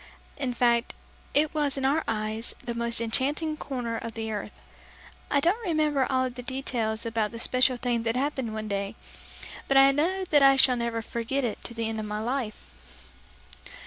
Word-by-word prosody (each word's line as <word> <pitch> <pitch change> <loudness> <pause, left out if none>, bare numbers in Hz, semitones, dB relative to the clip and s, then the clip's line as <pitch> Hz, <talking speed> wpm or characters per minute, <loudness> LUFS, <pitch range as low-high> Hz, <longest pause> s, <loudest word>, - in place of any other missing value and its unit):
In 270 -3 -2
fact, 240 0 +2 0.4
it 295 +1 +3
was 295 -3 0
in 270 - -1
our 295 +4 +2
eyes, 220 +1 -2
the 240 -1 -3
most 235 0 0
enchanting 285 +7 0
corner 245 -6 -4
of 230 0 -6
the 220 -1 -3
earth. 210 -1 -6 0.7
I 285 - +3
don't 370 +11 +1
remember 305 - +1
all 260 -1 +2
the 250 +1 -8
details 240 -4 -2
about 225 -2 0
the 230 - -8
special 255 +2 +2
thing 240 -2 0
that 230 +1 -1
happened 265 -3 -1
one 215 0 -4
day, 200 +1 -2 0.7
but 275 - +4
I 270 0 +8
know 360 +7 0
that 295 -2 +6
I 275 0 +7
shall 260 -1 +5
never 235 -1 -2
forget 235 +5 -2
it 230 -4 -3
to 235 - -4
the 230 -1 -2
end 220 0 -3
of 215 - -4
my 210 0 -3
life. 210 - -6
245 Hz, 185 wpm, -27 LUFS, 225-275 Hz, 0.7 s, I